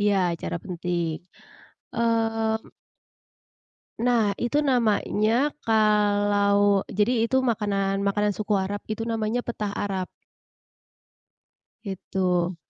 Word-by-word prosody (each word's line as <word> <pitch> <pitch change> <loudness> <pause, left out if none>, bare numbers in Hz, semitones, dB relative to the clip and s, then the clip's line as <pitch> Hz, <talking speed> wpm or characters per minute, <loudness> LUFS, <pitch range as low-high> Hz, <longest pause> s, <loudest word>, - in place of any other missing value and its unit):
iya, 205 0 +3 0.2
acara 170 - -4
penting. 175 -2 -2 0.9
Mhm 225 -1 0 1.3
Nah, 230 -4 +2
itu 290 +5 +1
namanya 235 +1 +2
kalau 205 -2 +3
jadi 210 +5 +1 0.2
itu 260 - +1
makanan 200 -4 0
makanan 205 +1 +1
suku 210 +1 -2
Arab, 205 +1 -4
itu 225 +1 -3
namanya 225 +1 -1
petah 215 -3 -3
Arab. 190 -2 -2 1.8
Itu. 185 -3 -1
210 Hz, 90 wpm, -25 LUFS, 200-225 Hz, 1.8 s, iya